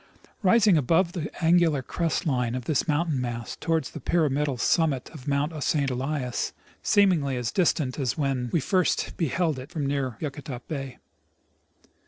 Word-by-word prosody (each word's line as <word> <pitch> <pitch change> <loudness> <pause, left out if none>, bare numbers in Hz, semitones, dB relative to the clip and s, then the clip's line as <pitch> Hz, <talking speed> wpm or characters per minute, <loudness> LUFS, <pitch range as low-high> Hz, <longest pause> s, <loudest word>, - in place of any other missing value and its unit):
Rising 200 -3 +5
above 165 +6 +2
the 170 -4 -4 0.2
angular 165 -5 +4
crest 170 +6 -1
line 125 -5 0
of 125 -2 -4
this 155 +2 0
mountain 150 -3 +1
mass 120 -2 -4
towers 160 -4 -1
the 160 - -7
pyram 155 0 +1
idal 140 -3 -1
summit 150 -4 +1
of 150 -4 -11
Mount 145 +2 -1
St. 140 -5 +1
Elias, 130 0 -2 0.3
seemingly 170 -10 +3
as 120 -2 -2
distant 155 -7 +1
as 130 0 -1
when 135 -4 0
Ave 150 +6 0
first 185 +5 +1
beheld 165 -2 0
it 130 - -9
from 160 -5 -3
near 135 -4 -1
Yakutat 140 -4 -6
bay. 135 -5 -5
145 Hz, 160 wpm, -26 LUFS, 130-165 Hz, 0.3 s, Rising